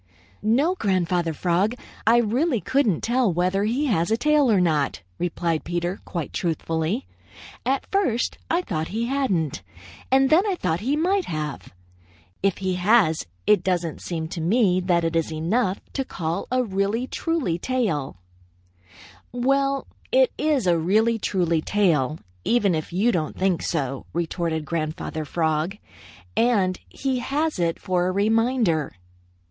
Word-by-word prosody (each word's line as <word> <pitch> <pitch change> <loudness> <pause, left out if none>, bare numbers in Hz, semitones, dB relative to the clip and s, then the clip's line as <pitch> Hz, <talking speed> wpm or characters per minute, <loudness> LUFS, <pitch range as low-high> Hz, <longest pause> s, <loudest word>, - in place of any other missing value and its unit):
"No, 270 +11 +2
Grandfather 180 - 0
Frog. 180 +8 +1 0.3
I 230 +1 +6
really 240 +4 +1
couldn't 250 - +1
tell 240 -3 +2
whether 185 +4 +1
he 250 +7 0
has 185 - +1
a 225 - +2
tail 300 -2 +3
or 200 - +4
not," 150 - +1 0.2
replied 170 -2 -1
Peter 175 +2 -2
quite 170 -5 -4
truthfully. 165 - -1 0.6
"At 270 +1 +1
first 355 - 0
I 345 +2 +1
thought 160 - -2
he 225 +4 -2
hadn't, 200 - 0 0.5
and 265 0 +4
then 320 +4 +7
I 390 - +1
thought 165 - -1
he 265 +7 0
might 370 +5 +1
have. 150 -3 -5 0.7
If 195 -1 +1
he 190 -1 -1
has, 180 - +3 0.2
it 205 -4 +4
doesn't 175 -3 -1
seem 160 -2 -3
to 170 - -5
me 185 +1 +3
that 175 -2 +1
it 165 0 -1
is 165 -1 0
enough 185 +6 0
to 270 - -1
call 170 -6 -3
a 255 0 +2
really 200 +3 -1
truly 270 - -1
tail." 175 - -1 1.1
"Well, 275 +2 +1 0.3
it - - +4
is 300 -7 +1
a 170 -2 +3
really 220 +7 +2
truly 175 -6 +1
tail, 155 -8 +1 0.3
even 210 -6 +2
if 155 -1 -3
you 200 +7 +2
don't 160 -6 -2
think 185 -3 +1
so," 135 -5 -2
retorted 165 -2 -2
Grandfather 155 -1 -3
Frog, 160 +4 -1 0.6
"and 200 -6 +2
he 265 -2 -2
has 295 - -1
it 170 -1 0
for 180 -1 0
a - - +1
reminder." 220 - +1
190 Hz, 145 wpm, -24 LUFS, 165-245 Hz, 1.1 s, then